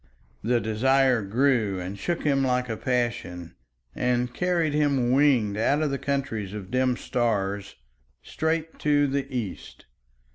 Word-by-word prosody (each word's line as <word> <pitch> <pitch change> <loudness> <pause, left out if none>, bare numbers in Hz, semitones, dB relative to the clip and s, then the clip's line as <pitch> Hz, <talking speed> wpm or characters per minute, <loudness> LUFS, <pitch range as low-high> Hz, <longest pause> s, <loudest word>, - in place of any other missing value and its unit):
The 120 +1 +2
desire 125 +3 +2
grew 110 -2 +1
and 90 +2 -5
shook 170 - -3
him 140 -2 +2
like 125 -1 0
a 115 - -1
passion 115 -9 -2 0.4
and 125 0 0
carried 175 -3 0
him 140 -5 +2
winged 130 -7 +3
out 140 +7 +2
of 150 - 0
the 140 - -2
countries 110 -8 -2
of 100 -2 -8
dim 130 -1 +1
stars 100 -4 -1 0.5
straight 160 - -2
to 145 -1 +3
the 140 0 -2
East. 115 -8 -6
125 Hz, 140 wpm, -26 LUFS, 110-140 Hz, 0.5 s, winged